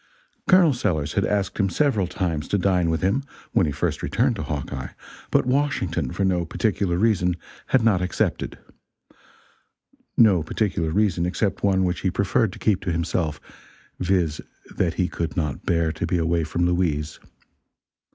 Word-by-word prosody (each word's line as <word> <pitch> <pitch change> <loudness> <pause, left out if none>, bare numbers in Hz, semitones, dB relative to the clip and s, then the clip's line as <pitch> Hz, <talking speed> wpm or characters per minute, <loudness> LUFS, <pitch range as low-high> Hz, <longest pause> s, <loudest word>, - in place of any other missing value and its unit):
Col. 180 -5 +6
Sellers 80 - -1
had - - +1
asked 100 0 -1
him 100 -1 +2
several 110 -5 +1
times, 85 -5 -2
to 100 - +1
dine 90 -3 +2
with 80 +1 -1
him, 120 +9 +1 0.3
when 95 -8 +3
he - - -1
first - - -2
returned 120 +1 +1
to - - -4
Hawkeye, 75 -4 -4 0.4
but - - +2
Washington, 125 - 0
for 100 - -1
no 90 -2 +1
particular 90 +1 0
reason, 90 -4 +2 0.3
had 130 -3 +3
not 105 -5 +3
accepted. 90 -1 -1 1.6
No 100 -7 +6
particular 85 0 -1
reason 90 -1 +1
except 95 +2 -1
one 95 -2 +3
which 90 -1 0
he 95 - 0
preferred 100 +3 +1
to - - -10
keep 105 -4 +1
to 90 - -2
himself 85 -2 -1 0.6
viz. 90 -5 0 0.3
that 85 -3 0
he 90 - +1
could 85 +1 -4
not 75 -5 -2
bear 85 -1 +2
to 80 +1 -3
be 90 - +1
away 85 -1 +1
from 85 +2 0
Louise. 80 -4 0
90 Hz, 160 wpm, -24 LUFS, 85-100 Hz, 1.6 s, Col